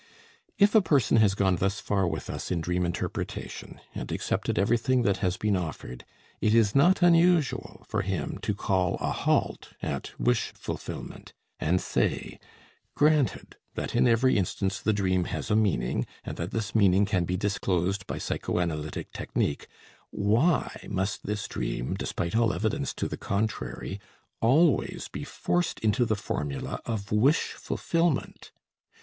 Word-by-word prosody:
If 205 0 +5
a 220 - +7
person 140 - +3
has 105 -3 +4
gone 95 -3 +2
thus 95 +4 0
far 100 -4 0
with 80 -2 -3
us - - -5
in 90 - 0
dream 90 +2 0
interpretation, 85 - -5
and - - -5
accepted - - -1
everything 120 +4 +2
that 100 -4 +2
has 90 -3 0
been 105 -2 +1
offered, 75 -8 -5 0.4
it 110 +1 +3
is 110 -3 +4
not 175 +7 +4
unusual 170 -3 +3
for 110 - 0
him 95 -5 -3
to 105 - -1
call 95 -3 +1
a - - -2
halt - - 0
at - - -5
wish 120 -1 +1
fulfillment, - - -7 0.3
and 90 +4 +2
say, - - -1 0.6
"Granted 150 -3 +2 0.2
that - - -4
in 120 - +4
every 120 0 +4
instance 95 +1 -1
the 110 - +2
dream 95 -3 +1
has 80 +1 -4
a - - +4
meaning, 100 - +1 0.2
and - - -5
that 85 +1 -3
this 110 -3 -3
meaning 100 -2 +4
can 95 -3 +1
be 90 +2 -1
disclosed 95 -1 -1
by - - -4
psychoanalytic 75 -4 -3
technique, 70 - -2 0.4
why 115 - +1
must 95 0 -2
this 105 0 -2
dream, - - -3
despite 85 +3 -3
all 115 -3 +3
evidence 90 - -1
to - - -2
the - - -5
contrary, 100 -1 -3 0.4
always 140 +6 +3
be - - -5
forced 175 -1 -1
into 110 +3 +2
the 110 -1 +1
formula 75 -8 -4
of 105 -3 -3
wish 125 +9 +3
fulfillment? 165 -4 -1
100 Hz, 150 wpm, -27 LUFS, 90-120 Hz, 0.6 s, a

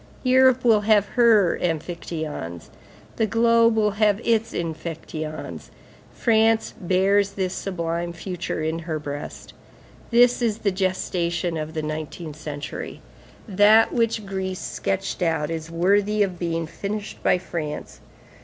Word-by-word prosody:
Europe 260 -1 +4
will 220 -3 +5
have 205 -1 +3
her 225 -7 +4
amphictyons; 160 - -4 0.5
the 220 - +2
globe 230 +1 +4
will 210 -1 +2
have 210 -1 +4
its 225 -1 +2
amphictyons. 160 -1 -5 0.4
France 225 -1 +2
bears 195 +2 +2
this 190 -2 -2
sublime 170 -3 -3
future 170 -2 -4
in 160 +1 -1
her 160 -1 -3
breast. 145 -1 -7 0.6
This 245 +1 +4
is 225 -3 +1
the 205 -3 0
gestation 180 -2 -1
of 155 0 -5
the 155 - -2
nineteenth 155 +1 -5
century. 150 -2 -6 0.5
That 210 +2 +5
which 230 -2 0
Greece 190 -1 -3
sketched 195 0 -3
out 160 -3 0
is 165 0 -5
worthy 200 +5 +2
of 185 -3 -4
being 165 -1 -1
finished 200 +6 -6
by - - +3
France. 160 -4 -6
185 Hz, 125 wpm, -23 LUFS, 165-215 Hz, 0.6 s, will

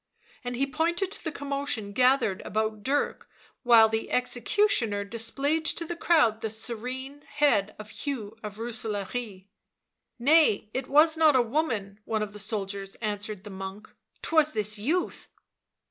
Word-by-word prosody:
And 245 0 -4
he 270 +3 +1
pointed 335 +6 -1
to - - -7
the 320 - -3
commotion 280 -8 -3
gathered 250 -5 +3
about 215 0 -2
Dirk, 280 +6 -1 0.3
while 230 -3 +7
the 220 0 -3
executioner 245 - +1
displayed 255 +9 -1
to 335 - -1
the 345 - -4
crowd 295 -11 +3
the 220 - -2
serene 250 +5 -5
head 240 -10 +1
of 215 0 -10
Hugh 225 -3 -5
of 210 -1 -7
Rooselaare. 220 -2 -4 0.4
" - - -57
Nay, 300 -10 +5
it 260 0 -3
was 315 +3 +5
not 310 -3 +5
a 255 - +6
woman," 225 -7 -2
one 220 -1 -1
of 205 -1 -6
the 210 - -9
soldiers 195 -1 -4
answered 210 -2 -4
the 210 - -9
monk, 190 +2 -8
" - - -42
'twas 315 -2 +3
this 210 0 +1
youth." 315 - -1
230 Hz, 155 wpm, -27 LUFS, 210-285 Hz, 0.4 s, while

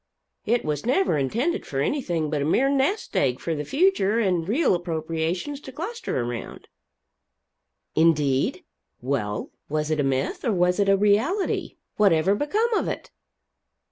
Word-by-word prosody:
It 235 +2 +1
was 150 -2 -2
never 260 - +2
intended 230 - 0
for 135 - -4
anything 170 - -1
but 150 -2 0
a - - +1
mere 260 - +3
nest 280 +10 0
egg 130 -2 +1
for 165 - -2
the 150 -1 -3
future 275 - +2
and 180 -5 0
real 275 - +3
appropriations 170 - -2
to 265 - -9
cluster 385 - -4
around." 120 -1 -5 1.3
"Indeed? 150 -5 +2 0.4
Well, 120 -5 -2 0.2
was 155 +1 -1
it 155 - 0
a - - +2
myth, 135 -1 -1
or 230 - +1
was 180 +1 +2
it 200 -1 +3
a 195 - +5
reality? 220 - +1 0.2
Whatever 190 -3 +4
become 415 - 0
of - - +1
it?" - - -5
180 Hz, 150 wpm, -24 LUFS, -, 1.3 s, a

